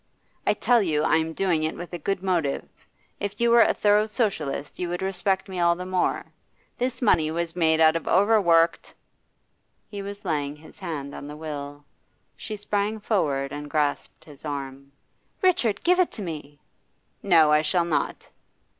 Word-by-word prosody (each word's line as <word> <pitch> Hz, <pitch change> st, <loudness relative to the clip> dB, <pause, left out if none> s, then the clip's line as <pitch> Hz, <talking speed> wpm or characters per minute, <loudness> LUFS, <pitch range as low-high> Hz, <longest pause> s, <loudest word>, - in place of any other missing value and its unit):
'I -, -, +3 dB
tell 245 Hz, -2 st, +3 dB
you 155 Hz, -6 st, 0 dB
I 160 Hz, -, +3 dB
am 160 Hz, 0 st, -1 dB
doing 175 Hz, -3 st, +1 dB
it 155 Hz, +1 st, -2 dB
with 175 Hz, +1 st, -8 dB
a 175 Hz, -, -4 dB
good 195 Hz, +3 st, -2 dB
motive. 170 Hz, -7 st, -1 dB, 0.5 s
If 205 Hz, 0 st, -4 dB
you 235 Hz, 0 st, +3 dB
were 235 Hz, 0 st, +7 dB
a -, -, +5 dB
thorough 210 Hz, +1 st, +3 dB
Socialist, 160 Hz, -, -2 dB
you 180 Hz, -, -2 dB
would 175 Hz, +2 st, -3 dB
respect 190 Hz, 0 st, 0 dB
me 185 Hz, -2 st, -5 dB
all 170 Hz, 0 st, +3 dB
the 180 Hz, +1 st, -6 dB
more. 185 Hz, 0 st, 0 dB, 0.5 s
This 250 Hz, +1 st, -1 dB
money 160 Hz, -8 st, +3 dB
was 165 Hz, +1 st, -2 dB
made 160 Hz, -2 st, +2 dB
out 160 Hz, 0 st, +5 dB
of 165 Hz, -, -3 dB
overworked 180 Hz, -5 st, +3 dB, 0.5 s
' -, -, -46 dB
He 205 Hz, -1 st, -5 dB
was 200 Hz, +1 st, -8 dB
laying 145 Hz, -4 st, -1 dB
his 155 Hz, +5 st, -16 dB
hand 150 Hz, -7 st, -5 dB
on 145 Hz, -, -8 dB
the 150 Hz, +1 st, -8 dB
will; 145 Hz, -2 st, -7 dB, 0.5 s
she 215 Hz, -, -6 dB
sprang 205 Hz, +1 st, -2 dB
forward 145 Hz, -11 st, 0 dB
and 145 Hz, 0 st, -6 dB
grasped 145 Hz, -1 st, -2 dB
his 145 Hz, -3 st, -15 dB
arm. 140 Hz, -2 st, -6 dB, 0.5 s
'Richard, 245 Hz, -, +2 dB
give 360 Hz, +1 st, +3 dB
it 365 Hz, -, +3 dB
to 210 Hz, -, -6 dB
me!' 150 Hz, -4 st, -7 dB, 0.6 s
'No, 165 Hz, -6 st, +5 dB
I 150 Hz, 0 st, +5 dB
shall 170 Hz, +2 st, +1 dB
not. 160 Hz, -3 st, -2 dB
170 Hz, 180 wpm, -25 LUFS, 150-200 Hz, 0.6 s, were